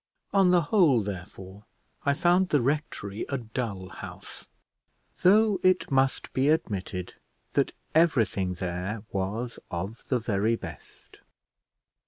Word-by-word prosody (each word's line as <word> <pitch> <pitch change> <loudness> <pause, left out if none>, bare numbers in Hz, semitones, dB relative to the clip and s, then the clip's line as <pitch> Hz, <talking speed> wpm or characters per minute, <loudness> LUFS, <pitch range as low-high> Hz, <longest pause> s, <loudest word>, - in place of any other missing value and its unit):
On 195 -2 +5
the 175 -1 +4
whole, 150 - +4
therefore, 95 +1 -8 0.4
I 140 - +4
found 175 +3 +3
the 145 - +3
rectory 130 -7 -2
a 140 - 0
dull 110 -6 -4
house, - - -9 0.7
though 210 +2 +5
it 185 -4 +2
must 135 0 +1
be 135 +2 +2
admitted 95 - -1 0.4
that - - +1 0.2
everything 115 - +2
there 90 +4 -4
was 105 +5 -3
of 95 +6 -5
the 130 - +2
very 110 -1 +1
best. - - -11
115 Hz, 120 wpm, -27 LUFS, 100-155 Hz, 0.7 s, On